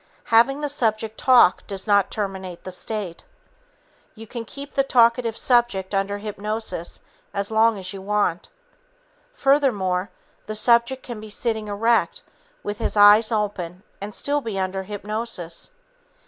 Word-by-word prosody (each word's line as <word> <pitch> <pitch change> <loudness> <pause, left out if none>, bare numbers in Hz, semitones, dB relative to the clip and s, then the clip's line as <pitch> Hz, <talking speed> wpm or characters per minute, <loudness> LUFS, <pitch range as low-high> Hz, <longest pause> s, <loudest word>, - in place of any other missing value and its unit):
Having 270 +6 +5
the 295 - -1
subject 220 -5 -1
talk 250 -8 +5
does 195 -2 -4
not 200 -2 +3
terminate 190 -4 -5
the 185 - -7
state. 190 -2 -4 0.9
You 225 0 -10
can 230 +1 -7
keep 280 +4 -9
the 275 - +3
talkative 235 -3 +3
subject 240 -6 +1
under 195 +1 0
hypnosis 210 -3 -4 0.3
as 200 +1 -1
long 220 0 +3
as 185 -1 -5
you 195 - -8
want. 200 -3 -1 0.9
Furthermore, 210 -10 +1 0.4
the 215 - -4
subject 235 +4 +3
can 240 -3 -7
be 215 0 -10
sitting 220 0 -2
erect 230 - +1 0.4
with 205 0 -4
his - - -2
eyes 210 +2 +7
open 195 -4 -3 0.2
and 205 +1 -5
still 290 0 0
be 220 -6 -5
under 190 0 -2
hypnosis. 205 - -5
215 Hz, 140 wpm, -23 LUFS, 195-235 Hz, 0.9 s, eyes